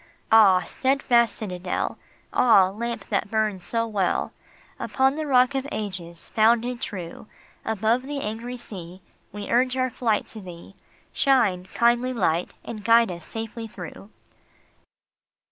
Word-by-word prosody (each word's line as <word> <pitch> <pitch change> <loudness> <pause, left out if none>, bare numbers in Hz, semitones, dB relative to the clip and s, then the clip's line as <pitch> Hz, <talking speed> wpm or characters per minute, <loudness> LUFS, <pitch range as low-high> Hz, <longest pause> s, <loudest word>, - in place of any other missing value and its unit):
Ah, 200 -5 +7
steadfast 255 0 +2
citadel! 180 -3 -3 0.3
Ah, 200 -6 +5
lamp 235 +4 -4
that 205 -1 -1
burns 215 -4 -1
so 230 -1 -1
well 205 -5 -1 0.5
Upon 265 +1 +1
the 310 0 -3
Rock 255 0 +4
of 270 0 -2
Ages, 185 -5 -5
founded 235 +2 +2
true! 180 +1 -6 0.4
Above 220 +3 +1
the 280 +2 -5
angry 235 +3 -5
sea 185 -5 -10 0.3
We 205 0 -7
urge 255 +2 +2
our 255 -1 0
flight 225 -3 0
to 220 - -9
thee. 180 0 -11 0.4
Shine, 220 -10 +2
kindly 240 +5 +2
Light, 175 -6 0
and 215 -3 -7
guide 230 -2 +5
us 170 -2 -9
safely 225 0 -6
through 195 0 -10
220 Hz, 130 wpm, -24 LUFS, 190-245 Hz, 0.5 s, Ah